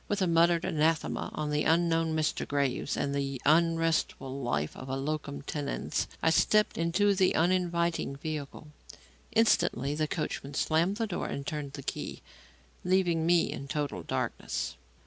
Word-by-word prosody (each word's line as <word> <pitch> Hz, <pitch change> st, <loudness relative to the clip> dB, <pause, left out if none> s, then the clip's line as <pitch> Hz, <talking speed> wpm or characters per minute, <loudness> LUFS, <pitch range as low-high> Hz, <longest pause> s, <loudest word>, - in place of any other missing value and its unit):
With 205 Hz, -, -1 dB
a -, -, +3 dB
muttered 170 Hz, 0 st, +3 dB
anathema 155 Hz, 0 st, 0 dB
on 150 Hz, -1 st, -2 dB
the 150 Hz, 0 st, +1 dB
unknown 165 Hz, -1 st, +2 dB
Mr. 155 Hz, -1 st, 0 dB
Graves 140 Hz, -1 st, -1 dB
and 140 Hz, -, -1 dB
the 140 Hz, -2 st, -2 dB
unrestful 165 Hz, -4 st, +2 dB
life 75 Hz, -, -1 dB
of 130 Hz, -, -9 dB
a 135 Hz, -, -1 dB
locum 145 Hz, 0 st, -3 dB
tenens, 145 Hz, -1 st, -2 dB, 0.2 s
I 160 Hz, -, +4 dB
stepped 210 Hz, +6 st, +3 dB
into 175 Hz, +5 st, +2 dB
the 185 Hz, -1 st, +2 dB
uninviting 170 Hz, -3 st, +1 dB
vehicle. 150 Hz, 0 st, -6 dB, 0.6 s
Instantly 145 Hz, -, +2 dB
the 155 Hz, +1 st, 0 dB
coachman 145 Hz, -3 st, -4 dB
slammed 170 Hz, +8 st, +1 dB
the 225 Hz, -, 0 dB
door 195 Hz, -5 st, -3 dB
and 140 Hz, -, -5 dB
turned 145 Hz, -2 st, -4 dB
the 140 Hz, -, -7 dB
key, -, -, -5 dB, 0.6 s
leaving 175 Hz, -3 st, +2 dB
me 175 Hz, -1 st, +3 dB
in 140 Hz, -, -6 dB
total 140 Hz, -, -2 dB
darkness. -, -, -3 dB
155 Hz, 150 wpm, -30 LUFS, 140-170 Hz, 0.6 s, I